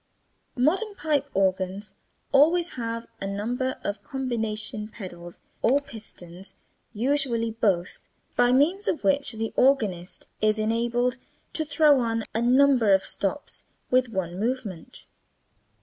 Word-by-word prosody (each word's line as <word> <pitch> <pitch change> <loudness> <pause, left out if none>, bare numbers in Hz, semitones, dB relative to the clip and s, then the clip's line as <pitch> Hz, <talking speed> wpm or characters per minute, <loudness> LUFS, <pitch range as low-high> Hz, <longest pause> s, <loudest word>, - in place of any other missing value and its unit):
Modern 380 - +1
pipe 295 -6 0
organs 190 +1 0 0.4
always 330 +5 +4
have 230 -1 -4 0.2
a 195 - -2
number 240 +6 -2
of 205 0 -4
combination 220 -3 -2
pedals 175 -5 -9 0.2
or 270 +4 +4
pistons 195 -8 -8 0.4
(usually 235 -1 0
both), 195 -6 -1 0.3
by 245 0 +4
means 320 +10 +2
of 320 - -1
which 280 -3 +3
the 225 0 -3
organist 210 -10 +1
is 215 0 +3
enabled 235 +3 0 0.4
to 315 - +1
throw 290 -1 +4
on 230 -2 0
a 225 - 0
number 250 -4 +5
of 190 - 0
stops 205 +9 -3 0.3
with 255 -1 +3
one 185 -4 -3
movement. 215 -7 -4
230 Hz, 120 wpm, -26 LUFS, 205-270 Hz, 0.4 s, number